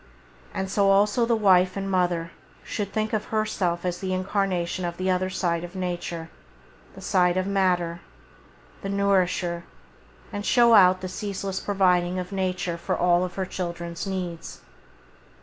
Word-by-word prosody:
And 190 Hz, -, -3 dB
so 195 Hz, +1 st, +2 dB
also 205 Hz, +4 st, +3 dB
the 230 Hz, -, +3 dB
wife 185 Hz, -3 st, +4 dB
and 195 Hz, 0 st, -3 dB
mother 175 Hz, -3 st, 0 dB, 0.3 s
should 205 Hz, -2 st, -4 dB
think 215 Hz, 0 st, -2 dB
of 215 Hz, -1 st, 0 dB
herself 195 Hz, -5 st, -1 dB
as 180 Hz, 0 st, -2 dB
the 190 Hz, -1 st, -2 dB
incarnation 185 Hz, -2 st, -1 dB
of 175 Hz, 0 st, -3 dB
the 185 Hz, 0 st, 0 dB
other 185 Hz, 0 st, 0 dB
side 170 Hz, -3 st, -1 dB
of 175 Hz, +2 st, -9 dB
Nature, 175 Hz, -2 st, -4 dB, 0.6 s
the -, -, -11 dB
side 180 Hz, -2 st, +2 dB
of 185 Hz, -, +1 dB
matter, 180 Hz, -4 st, 0 dB, 0.8 s
the 195 Hz, -, -4 dB
[Page -, -, -2 dB
16] -, -, -1 dB
nourisher, 180 Hz, -3 st, +1 dB, 0.7 s
and 205 Hz, -, -3 dB
show 235 Hz, +1 st, +5 dB
out 185 Hz, -3 st, +6 dB
the 185 Hz, -, -4 dB
ceaseless 195 Hz, 0 st, -4 dB
providing 180 Hz, -3 st, +2 dB
of 180 Hz, +1 st, -4 dB
Nature 185 Hz, -3 st, -2 dB
for -, -, -2 dB
all 175 Hz, +1 st, +3 dB
her 190 Hz, +1 st, -4 dB
children's 170 Hz, -1 st, -5 dB
needs. 180 Hz, -3 st, -5 dB
185 Hz, 160 wpm, -25 LUFS, 175-195 Hz, 0.8 s, out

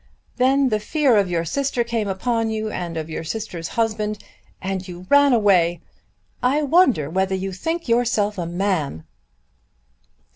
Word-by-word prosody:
Then 265 Hz, +1 st, +3 dB
the 215 Hz, -2 st, 0 dB
fear 275 Hz, +3 st, +2 dB
of 200 Hz, -3 st, +2 dB
your 170 Hz, -1 st, -1 dB
sister 265 Hz, -, -1 dB
came 230 Hz, -3 st, -2 dB
upon 225 Hz, +4 st, -1 dB
you, 220 Hz, 0 st, -3 dB
and 170 Hz, -2 st, -4 dB
of 155 Hz, -1 st, -4 dB
your 160 Hz, 0 st, -5 dB
sister's 175 Hz, -2 st, -5 dB
husband, 215 Hz, -2 st, 0 dB, 0.4 s
and 190 Hz, -1 st, -4 dB
you 180 Hz, 0 st, -9 dB
ran 285 Hz, 0 st, +6 dB
away! 185 Hz, -7 st, +3 dB, 0.6 s
I 275 Hz, +5 st, +2 dB
wonder 280 Hz, -, +3 dB
whether 190 Hz, +4 st, 0 dB
you 190 Hz, +1 st, -3 dB
think 325 Hz, -, -3 dB
yourself 230 Hz, -4 st, +1 dB
a 170 Hz, -, -2 dB
man!" 170 Hz, -, -2 dB
210 Hz, 150 wpm, -22 LUFS, 180-245 Hz, 0.6 s, ran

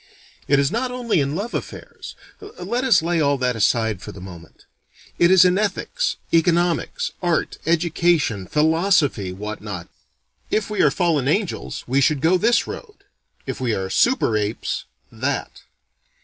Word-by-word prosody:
It 140 Hz, -, +4 dB
is 140 Hz, 0 st, +2 dB
not 250 Hz, +3 st, -1 dB
only 245 Hz, -9 st, 0 dB
in 140 Hz, +2 st, -2 dB
love 210 Hz, +7 st, -4 dB
affairs: -, -, -7 dB, 0.3 s
let 240 Hz, -, -4 dB
us 235 Hz, -11 st, +4 dB
lay 170 Hz, -1 st, +1 dB
all 140 Hz, -1 st, +2 dB
that 125 Hz, -2 st, 0 dB
aside 110 Hz, -2 st, +1 dB
for -, -, -8 dB
the 100 Hz, -, -11 dB
moment. 90 Hz, -3 st, -12 dB, 0.5 s
It 170 Hz, -, +5 dB
is 185 Hz, -1 st, +7 dB
in 180 Hz, +2 st, +3 dB
ethics, 345 Hz, -, -1 dB, 0.2 s
economics, 175 Hz, -, +1 dB
art, 175 Hz, -3 st, -1 dB
education, 165 Hz, -, +1 dB
philosophy, 155 Hz, -, +2 dB
what 105 Hz, +3 st, -6 dB
not. 100 Hz, -5 st, -7 dB, 0.6 s
If 215 Hz, 0 st, -1 dB
we 210 Hz, -, 0 dB
are -, -, +5 dB
fallen 160 Hz, -7 st, 0 dB
angels, 195 Hz, +5 st, -2 dB
we 135 Hz, +3 st, +1 dB
should 150 Hz, +1 st, +2 dB
go 170 Hz, +5 st, +3 dB
this 230 Hz, +4 st, +3 dB
road: 425 Hz, -4 st, -8 dB, 0.5 s
if -, -, -5 dB
we 120 Hz, -3 st, 0 dB
are 95 Hz, 0 st, -4 dB
super 240 Hz, -, +2 dB
apes, 105 Hz, +1 st, -2 dB, 0.3 s
that. -, -, -3 dB
165 Hz, 155 wpm, -21 LUFS, 120-200 Hz, 0.6 s, is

